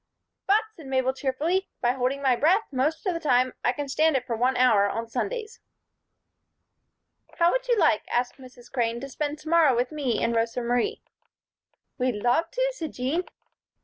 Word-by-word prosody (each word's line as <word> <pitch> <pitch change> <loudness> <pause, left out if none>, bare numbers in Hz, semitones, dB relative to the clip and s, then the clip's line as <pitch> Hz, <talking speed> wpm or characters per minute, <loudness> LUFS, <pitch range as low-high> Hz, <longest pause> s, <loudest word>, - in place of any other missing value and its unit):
"But," 415 +3 +4
said 310 -5 -12
Mabel, 260 -1 +1
cheerfully, 295 +8 -1
"by 240 - +2
holding 265 +2 -2
my 260 -2 +4
breath 355 - +3
most 290 - -1
of 370 - +1
the 335 - -3
time 255 -4 +2
I - - +3
can 285 +3 -5
stand 305 +1 +2
it 250 - -5
for 240 -3 -2
one 250 +3 +1
hour 220 -5 +4
on 230 +2 -4
Sundays." 465 - -4 1.8
"How 340 0 +4
would - - -1
you 480 -2 +2
like," 310 - +3
asked 245 +2 -1
Mrs. 250 -2 -15
Crane, 235 -2 -1
"to 275 - -6
spend 295 +3 -3
to 305 +1 -9
morrow 320 -6 +5
with 245 +3 0
me 280 -6 -1
and 235 - +1
Rosa 230 +2 0
Marie?" 245 - -1 1.0
"We'd 250 -2 +1
love 245 +9 +1
to," - - 0
said 320 -9 -6
Jean. 285 +9 -1
265 Hz, 180 wpm, -26 LUFS, 245-330 Hz, 1.8 s, morrow